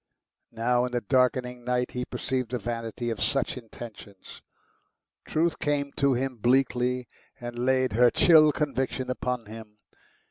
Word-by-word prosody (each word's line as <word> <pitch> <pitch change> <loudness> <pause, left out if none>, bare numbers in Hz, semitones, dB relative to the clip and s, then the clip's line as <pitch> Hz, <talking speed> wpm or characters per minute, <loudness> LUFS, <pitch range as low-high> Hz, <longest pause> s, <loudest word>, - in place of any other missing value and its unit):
Now, 120 +2 +2
in 125 - -6
the 120 - 0
darkening 125 +1 +1
night, 125 0 -1
he 125 0 -3
perceived 130 -3 -3
the 125 - -2
vanity 115 0 -4
of 115 - -5
such 135 -2 0
intentions. 110 -4 -11 0.8
Truth 165 +1 0
came 145 -1 -1
to 140 -2 +3
him 130 0 -2
bleakly, 125 +1 +1 0.3
and 120 -1 -6
laid 130 -2 +2
her 120 +2 +5
chill 155 +2 +6
conviction 135 -3 -2
upon 125 -2 -3
him. 110 0 -11
125 Hz, 140 wpm, -27 LUFS, 120-130 Hz, 0.8 s, chill